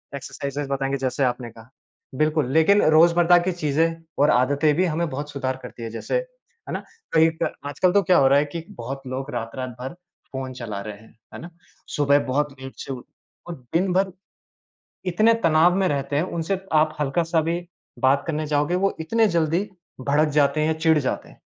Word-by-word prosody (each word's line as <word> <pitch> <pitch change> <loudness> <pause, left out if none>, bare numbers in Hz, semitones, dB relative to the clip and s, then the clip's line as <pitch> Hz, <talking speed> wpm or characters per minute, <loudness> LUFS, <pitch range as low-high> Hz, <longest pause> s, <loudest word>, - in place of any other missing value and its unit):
Exercises 140 +1 -5
बताएँगे 135 0 -1
जैसे 135 +1 -1
आपने 125 -1 -1
कहा। 115 +1 -16 0.5
बिल्कुल, 155 -2 +1
लेकिन 180 +6 +5 0.2
रोज़मर्रा 170 +1 +6
की - - +2
चीज़ें 165 0 0 0.2
और 145 - +5
आदतें 140 +4 +3
भी 185 +3 +2
हमें 165 0 -1
बहुत 145 +2 -5
सुधार 130 -2 -3
करती 115 - -9
हैं 115 - -4
जैसे, 115 - -3 0.5
है - - -5
ना, - - -4 0.3
कहीं 160 0 +5
क - - +1 0.2
आजकल 175 +6 +1
तो 200 - +5
क्या 185 - +4
हो 135 - +5
रहा 140 +1 +5
है 150 - +1
कि 165 +3 -6
बहुत 130 +4 -6
लोग 130 +2 -4
रात-रात 120 +2 -4
भर 130 +4 -5 0.4
फ़ोन 130 -1 -4
चला 115 -5 -6
रहे 105 +1 -6
हैं, 110 +2 -19 0.2
है - - -8
ना। 170 - -8 0.5
सुबह 145 0 +4
बहुत 145 +3 0
लेट 135 0 -8
से 135 - -5
उठ 125 - -8 0.4
और 170 - -5 0.2
दिन 180 +2 +2
भर 190 +1 +2 1.0
इतने 215 +6 +4
तनाव 170 -4 +4
में 190 - +2
रहते 140 0 -1
हैं, 155 - +2
उनसे 180 +1 -2
आप 155 0 +3
हल्का-सा 165 +4 +1
भी 165 +2 -1 0.4
बात 135 +1 +3
करने 155 -2 -2
जाओगे, 150 +3 +1
वो 195 +2 +1
इतने 225 +8 +2
जल्दी 170 0 +1 0.4
भड़क 145 +4 +2
जाते 145 0 +2
हैं 155 - +2
या 160 - +2
चिढ़ 160 -1 +4
जाते 135 -3 -3
हैं, - - -19
150 Hz, 195 wpm, -23 LUFS, 135-165 Hz, 1.0 s, रोज़मर्रा